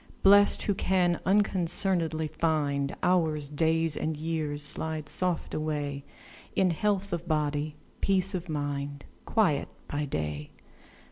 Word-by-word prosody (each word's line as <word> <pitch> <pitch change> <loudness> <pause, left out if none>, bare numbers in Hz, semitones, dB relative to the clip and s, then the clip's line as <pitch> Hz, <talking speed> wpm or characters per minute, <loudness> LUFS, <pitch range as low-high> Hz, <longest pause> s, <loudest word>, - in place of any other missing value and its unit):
Blest, 205 +1 +5
who 205 - +1
can 180 -2 +1
unconcern'dly 180 -4 +2
find 145 -4 0
Hours, 160 -5 +1
days, 160 +1 +1
and 160 0 -2
years, 155 -2 -2
slide 155 +1 0
soft 180 +2 +2
away 145 -2 -3 0.5
In 185 -2 +3
health 200 +2 -1
of 170 0 -4
body, 150 -1 -1 0.3
peace 195 0 +1
of 180 -1 -4
mind, 145 -1 -3 0.2
Quiet 180 -11 +1 0.2
by 145 +1 -2
day. 75 - -4
160 Hz, 120 wpm, -28 LUFS, 145-180 Hz, 0.5 s, Blest